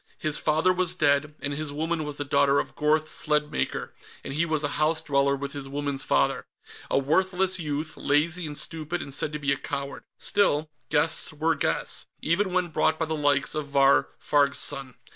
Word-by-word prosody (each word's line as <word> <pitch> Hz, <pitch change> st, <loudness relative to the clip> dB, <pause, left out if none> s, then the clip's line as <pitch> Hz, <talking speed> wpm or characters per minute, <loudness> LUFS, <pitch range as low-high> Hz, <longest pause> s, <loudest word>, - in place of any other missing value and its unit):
His 155 Hz, -2 st, 0 dB
father 160 Hz, +4 st, +2 dB
was 180 Hz, -1 st, +1 dB
dead, 145 Hz, -1 st, +2 dB
and 145 Hz, 0 st, -2 dB
his 150 Hz, 0 st, -4 dB
woman 160 Hz, +2 st, -2 dB
was 150 Hz, -1 st, -6 dB
the 145 Hz, -, -3 dB
daughter 140 Hz, 0 st, +3 dB
of -, -, -4 dB
Gorth 155 Hz, +1 st, +1 dB
Sledmaker, 150 Hz, 0 st, -1 dB, 0.3 s
and 135 Hz, -, -5 dB
he 165 Hz, +4 st, +1 dB
was 155 Hz, -2 st, 0 dB
a -, -, +1 dB
house 155 Hz, +1 st, +3 dB
dweller 140 Hz, -3 st, +1 dB
with 140 Hz, 0 st, -5 dB
his 140 Hz, -1 st, -6 dB
woman's 140 Hz, -1 st, -2 dB
father. -, -, +1 dB, 0.4 s
A -, -, +2 dB
worthless 185 Hz, +6 st, +2 dB
youth, 155 Hz, 0 st, -3 dB
lazy 160 Hz, +4 st, +1 dB
and 145 Hz, -1 st, -6 dB
stupid 165 Hz, +2 st, -3 dB
and 140 Hz, -, -6 dB
said 145 Hz, -, 0 dB
to -, -, -1 dB
be 140 Hz, -1 st, 0 dB
a 140 Hz, -, +1 dB
coward. 140 Hz, 0 st, -5 dB, 0.2 s
Still, 155 Hz, -7 st, +1 dB, 0.2 s
guests 155 Hz, +2 st, +2 dB
were 160 Hz, +2 st, +1 dB
guests, 155 Hz, -, -1 dB
even 185 Hz, +4 st, +1 dB
when 180 Hz, -1 st, 0 dB
brought 160 Hz, 0 st, +1 dB
by 160 Hz, -, -1 dB
the 160 Hz, -, -3 dB
likes 145 Hz, -2 st, +1 dB
of 155 Hz, -2 st, -3 dB
Vahr 140 Hz, -1 st, +4 dB
Farg's 140 Hz, -1 st, +2 dB
son. 135 Hz, -2 st, -4 dB
150 Hz, 195 wpm, -26 LUFS, 140-160 Hz, 0.4 s, Vahr